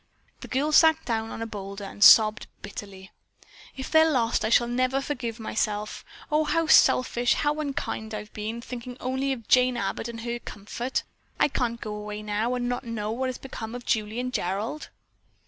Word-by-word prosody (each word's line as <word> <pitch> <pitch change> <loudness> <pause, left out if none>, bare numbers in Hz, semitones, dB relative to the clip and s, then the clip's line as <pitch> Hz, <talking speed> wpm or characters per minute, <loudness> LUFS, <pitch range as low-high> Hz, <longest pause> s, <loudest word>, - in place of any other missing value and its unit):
The - - -9
girl 280 +4 0
sank 320 +1 +5
down 225 -2 -1
on 225 - -5
a - - -3
boulder 200 -2 -7
and 200 +1 -2
sobbed 215 0 +7 0.2
bitterly. 195 -1 -9 0.7
"If 265 - -6
they're 320 0 +6
lost 240 -6 +1
I 215 - +1
shall 235 +1 +4
never 255 +2 +1
forgive 250 -5 -4
myself. 215 -1 -2 0.3
Oh, 305 +1 +3
how 325 +2 +1
selfish, 245 -5 +4
how 295 +1 0
unkind 245 -7 -3
I - - -2
have 210 +1 -10
been, 220 +2 -4
thinking 245 0 -7
only 265 +2 -1
of 235 -4 -5
Jane 255 -1 +4
Abbott 200 +1 -2
and 230 -1 -7
her 240 +1 -3
comfort. 235 +5 -4 0.4
I - - +4
can't 235 -3 -1
go 215 -3 -5
away 210 0 -6
now, 215 +4 -1
and 245 -1 -2
not 245 0 -2
know 220 -2 -3
what 260 +3 -1
has 255 - -5
become 230 -3 -7
of 245 - -8
Julie 215 +1 -1
and 250 0 -3
Gerald." 205 +11 -3
235 Hz, 190 wpm, -26 LUFS, 215-255 Hz, 0.7 s, sobbed